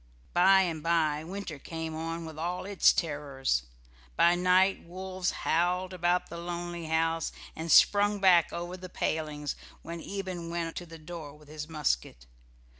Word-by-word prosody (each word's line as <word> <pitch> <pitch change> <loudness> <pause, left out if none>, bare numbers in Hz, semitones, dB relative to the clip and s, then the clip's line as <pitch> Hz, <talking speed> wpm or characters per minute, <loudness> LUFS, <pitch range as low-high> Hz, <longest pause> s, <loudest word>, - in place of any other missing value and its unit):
By 190 +2 +6
and 165 -4 -2
by 155 -2 +1
winter 175 -3 -6
came 160 +1 -5
on 165 +1 -4
with 160 -1 -8
all 175 +3 -3
its 200 -1 +5
terrors. 140 - -1 0.5
By 170 - +5
night 185 +2 +3
wolves 185 +1 -3
howled 180 +3 0
about 180 0 +1
the 170 - -7
lonely 175 0 -5
house, 165 0 +1 0.2
and 160 +1 -3
sprung 205 +4 +6
back 180 -4 +5
over 175 +1 -5
the 185 0 -9
palings 150 -3 -2 0.3
when 170 0 -6
Eben 185 -3 -5
went 170 -1 -3
to 175 - -6
the 165 0 -10
door 155 -2 -8
with 150 -1 -18
his 155 +1 -7
musket. 65 - -1
170 Hz, 155 wpm, -29 LUFS, 160-180 Hz, 0.5 s, By